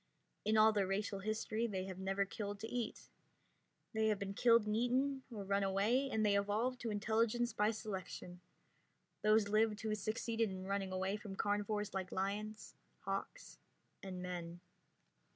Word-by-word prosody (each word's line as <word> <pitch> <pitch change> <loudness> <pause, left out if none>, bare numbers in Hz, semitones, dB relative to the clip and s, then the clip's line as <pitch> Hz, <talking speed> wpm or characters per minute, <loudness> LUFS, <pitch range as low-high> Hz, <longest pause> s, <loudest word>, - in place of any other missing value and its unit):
In 215 +1 +3
all 215 +1 +8
their 200 -2 +2
racial 195 +1 -1
history 215 +2 -1
they 190 -4 -2
have 190 -1 -6
never 195 +1 +1
killed 205 0 -5
to 225 - -3
eat. 235 -1 -3 0.9
They 220 0 +2
have 215 -1 +2
been 195 0 -4
killed 230 +1 +5
and 210 0 0
eaten, 260 +4 +1
or 210 -3 -5
run 200 +1 +1
away, 205 +8 +2
and 220 -3 +1
they 205 -1 +4
evolved 215 +5 +1
to 235 - -2
intelligence 225 +3 +1
by 210 +1 +3
selection. 190 -4 -5 0.8
Those 215 0 +4
lived 215 0 +2
who 220 -1 -1
succeeded 220 +2 0
in 185 0 -6
running 195 -1 -1
away 190 +2 -1
from 210 -3 -7
carnivores 205 +1 0
like 190 -1 -3
lions, 210 +3 -3 0.3
hawks, - - -5 0.4
and 185 -2 -5
men. 175 -1 -5
210 Hz, 160 wpm, -37 LUFS, 195-220 Hz, 0.9 s, all